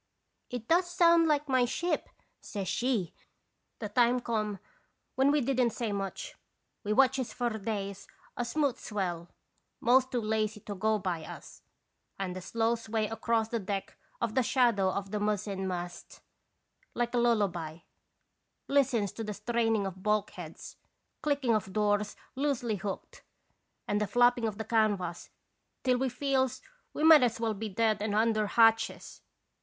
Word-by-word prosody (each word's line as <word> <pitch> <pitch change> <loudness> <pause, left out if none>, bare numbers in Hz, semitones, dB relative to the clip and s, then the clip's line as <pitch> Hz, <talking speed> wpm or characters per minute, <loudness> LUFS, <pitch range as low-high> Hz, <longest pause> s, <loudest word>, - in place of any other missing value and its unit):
' - - -50
"'It 245 -2 -6
does 350 +2 +3
sound 340 -1 +5
like 295 -1 +1
'my 260 -2 +3
ship',' 345 +8 -1 0.3
says 200 -3 -5
she. 220 -3 0 0.3
" - - -50
The 215 - -2
time 240 +3 +3
come 215 -4 -2 0.6
when 265 +1 +3
we 295 0 +3
didn't 250 -1 +2
say 230 -4 -2
much. 195 -1 -4 0.5
We 210 - -2
watches 260 +2 +3
for 245 -1 -1
days 200 -2 -4 0.3
a 245 - -1
smooth 275 +1 0
swell, 175 -5 -3 0.5
most 255 +2 +4
too 245 - 0
lazy 215 0 -1
to 205 - -6
go 215 +2 +1
by 180 -5 -3
us, - - -11 0.6
and 185 -2 -3
the 185 - -5
slow 225 +4 0
sway 225 -1 -2
across 225 0 0
the 230 - -1
deck 195 -1 -4 0.2
of 235 -2 -1
the 260 - +3
shadow 235 -6 +3
of 195 +1 -3
the 210 - -1
mizzen 205 -2 -1
mast, 175 -1 -6 0.7
like 240 0 -1
a 245 - +2
lullaby, 180 -9 0 0.9
listens 250 -8 +2
to 225 - -6
the 210 -1 -4
straining 225 -1 0
of 190 -1 -6
bulk 210 0 +1
heads, 170 -5 -10 0.4
clicking 285 -5 +1
of 195 -3 -1
doors 210 -1 +1 0.2
loosely 255 -6 -1
hooked, 195 +1 -6 0.7
and 205 +1 0
the 210 - 0
flapping 245 0 +3
of 210 -2 -4
the 220 - -4
canvas, 205 -6 0 0.5
till 250 -1 +2
we 265 0 +1
feels 260 0 0 0.3
we 300 - -4
might 320 -1 +9
as 235 -2 +1
well 225 -1 0
be 215 +1 -5
dead 215 +1 +1
and 210 -1 -1
under 215 -1 +2
hatches. 225 +1 +2
220 Hz, 160 wpm, -30 LUFS, 205-245 Hz, 0.9 s, might